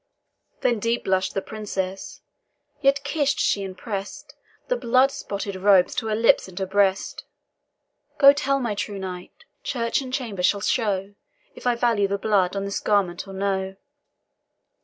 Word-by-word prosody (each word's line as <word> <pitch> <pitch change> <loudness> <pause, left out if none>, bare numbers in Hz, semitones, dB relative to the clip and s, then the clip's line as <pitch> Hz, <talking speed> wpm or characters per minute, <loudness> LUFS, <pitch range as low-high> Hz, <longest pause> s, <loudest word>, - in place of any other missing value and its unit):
Then 240 -3 +1
deep 230 +3 -1
blush'd 190 0 0
the 195 - -1
Princess 195 -3 -5 0.6
yet 275 0 +3
kiss'd 290 -3 0
she 200 - +1
and 190 -1 -7
press'd 200 -3 -6 0.3
The - - +1
blood 255 - +3
spotted 200 -6 -5
robes 190 -1 +4
to 225 - -3
her 215 - 0
lips 230 -2 +3
and 185 -1 -14
her 190 - -1
breast. 195 0 0 0.9
"Go 280 -1 +8
tell 275 -1 0
my 235 -5 -1
true 205 0 -4
knight, 185 -2 -8 0.2
church 245 - -1
and 260 -1 -7
chamber 235 -8 -3
shall 200 +2 +2
show 200 -3 0 0.4
If - - -7
I 245 - +3
value 230 -4 +2
the 200 +1 -1
blood 195 -3 +1
on 195 0 -2
this 200 - -2
garment 195 -3 0
or 195 - -9
no." 190 -1 -2
205 Hz, 160 wpm, -24 LUFS, 190-235 Hz, 0.9 s, Go